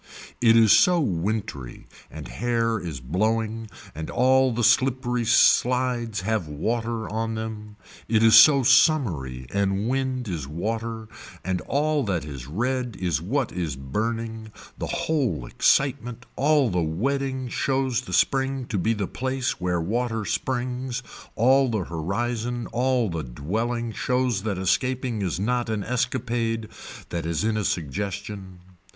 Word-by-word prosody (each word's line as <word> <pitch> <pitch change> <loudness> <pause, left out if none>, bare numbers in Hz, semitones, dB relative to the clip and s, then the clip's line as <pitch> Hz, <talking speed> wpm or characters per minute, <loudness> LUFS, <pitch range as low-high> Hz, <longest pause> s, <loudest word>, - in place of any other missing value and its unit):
It 115 -1 +6
is 110 -2 +6
so 180 -3 +6
wintry 95 - -3 0.2
and 75 0 -8
hair 115 -2 0
is 80 -8 -6
blowing 110 - -1 0.2
and 80 +1 -6
all 130 +1 +3
the 120 +1 -1
slippery 125 0 +2
slides 120 -2 +3
have 105 -3 -1
water 115 +9 -2
on 115 +1 -2
them, 110 -1 -6 0.3
it 110 0 +3
is 115 -1 +6
so 135 +4 +8
summery 105 - +3
and 100 +1 0
wind 130 -1 -1
is 80 -8 -4
water 110 +7 -4 0.4
and 90 -1 -1
all 150 0 +1
that 90 -7 -1
is 70 -4 -8
red 125 - -2
is 85 -7 0
what - - -1
is 85 -6 -3
burning, 110 - -4 0.2
the - - -4
whole 125 - -1
excitement, 125 - +1
all 145 -4 +3
the 90 -1 +1
wedding 130 - -1
shows 130 0 0
the 125 - -8
spring 135 -1 +1
to 105 - -1
be 110 +6 +1
the 105 -3 -2
place 130 +2 -3
where 90 -1 0
water 115 +4 -1
springs, 125 +1 -2 0.3
all 130 +3 +4
the 110 -5 -1
horizon, 115 +9 -3
all 125 -1 +1
the 85 -4 -3
dwelling 110 - -3
shows 125 -3 0
that 100 -2 -2
escaping 125 +4 0
is 90 -4 -2
not 120 +3 0
an 110 -2 -1
escapade 115 -2 -1 0.4
that 85 - -3
is 85 +3 -1
in 110 0 +1
a 105 - -1
suggestion. 95 +3 -4
115 Hz, 140 wpm, -25 LUFS, 95-125 Hz, 0.4 s, so